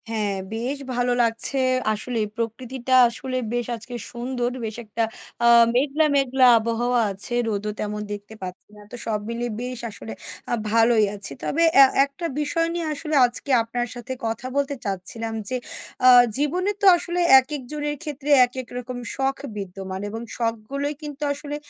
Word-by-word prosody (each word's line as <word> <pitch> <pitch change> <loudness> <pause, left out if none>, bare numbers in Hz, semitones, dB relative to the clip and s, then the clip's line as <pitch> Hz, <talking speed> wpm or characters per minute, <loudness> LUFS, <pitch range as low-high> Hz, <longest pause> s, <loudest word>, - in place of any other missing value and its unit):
হ্যাঁ, 215 -3 -1 0.2
বেশ 245 +5 -2 0.2
ভালো 245 0 +1
লাগছে। 230 +4 +1 0.4
আসলেই 220 +1 -2
প্রকৃতিটা 245 +2 -3 0.2
আসলে 255 +2 -4 0.2
বেশ 240 -1 -1
আজকে 235 +2 -9 0.2
সুন্দর। 245 0 -2
বেশ 220 -1 -4
একটা 220 +2 -2 0.4
আ - - +5 0.3
মেঘলা, 285 +4 +2
মেঘলা 265 -1 +3
আবহাওয়া 235 +2 0
আছে। 195 +5 -2
রোদও 210 -1 -2
তেমন 210 0 -3
দেখতে 205 +1 -7
পাচ্ছি 180 -1 -8
না। 210 - -14
তো - - -7
সব 215 -2 -1
মিলিয়ে 235 0 -3
বেশ 250 -1 -5
আসলে 115 - -8 0.4
আ - - +2 0.2
ভালোই 225 -1 +4
আছি। 200 -1 -3
তবে 330 - 0 0.2
অ্যা 275 - +11 0.2
একটা 280 +5 -8
বিষয় 330 +3 0
নিয়ে 340 -1 -2
আসলে 305 +1 -3
আজকে 245 +3 -2
আপনার 240 +1 -3
সাথে 245 +2 -8
কথা 225 +2 -3
বলতে 280 0 0
চাচ্ছিলাম। 205 +4 -3 0.2
যে 255 - -1 0.5
আ - - +9 0.3
জীবনে 355 +8 0
তো - - +1
আসলে 345 +1 -3 0.2
একেকজনের 295 +2 -4
ক্ষেত্রে 295 -2 -6 0.2
একেক 255 0 -7
রকম 250 0 -6 0.2
শখ 270 0 0 0.2
বিদ্যমান। 190 -1 -6
এবং 225 +2 -6 0.2
শখগুলোই 235 +5 -2
কিন্তু 295 -1 -8
আসলে 290 0 -6
245 Hz, 160 wpm, -23 LUFS, 225-275 Hz, 0.5 s, অ্যা